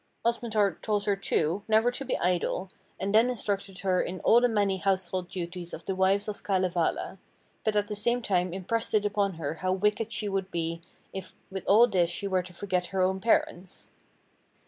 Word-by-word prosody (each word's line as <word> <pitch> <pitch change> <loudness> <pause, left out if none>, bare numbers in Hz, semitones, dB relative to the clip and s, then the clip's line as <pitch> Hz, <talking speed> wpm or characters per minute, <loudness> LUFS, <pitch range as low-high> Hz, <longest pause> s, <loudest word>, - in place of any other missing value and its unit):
Osmotar 220 -5 +1
told 210 -2 0
her, 205 -1 +2
too, 180 -1 0
never 220 +2 +4
to 260 - -5
be 265 - -1
idle, 180 +1 -1 0.3
and 200 +1 -2
then 225 +3 +5
instructed 200 -5 -3
her 185 -1 +2
in 185 +1 -4
all 235 +2 +5
the 245 - +4
many 205 -3 +1
household 185 -1 -1
duties 175 -1 -6
of 165 - -12
the 195 - -1
wives 190 +2 +2
of 210 -1 -5
Kalevala, 185 -1 0 0.4
but 215 -1 0
at 205 0 +2
the 210 - -4
same 235 +4 +2
time 180 -6 0
impressed 205 +6 -2
it 210 -1 +3
upon 200 -2 0
her 160 -2 -3
how 185 0 +1
wicked 210 +3 0
she 210 - -1
would 195 -1 -2
be 165 -1 -3 0.3
if 190 -1 -7 0.2
with 190 0 -6
all 220 +4 +7
this 185 -7 +2
she 200 +3 -3
were 185 -1 +1
to 180 0 -11
forget 180 -1 -2
her 190 -1 0
own 190 +1 +1
parents. 190 -3 -1
195 Hz, 195 wpm, -28 LUFS, 185-210 Hz, 0.4 s, all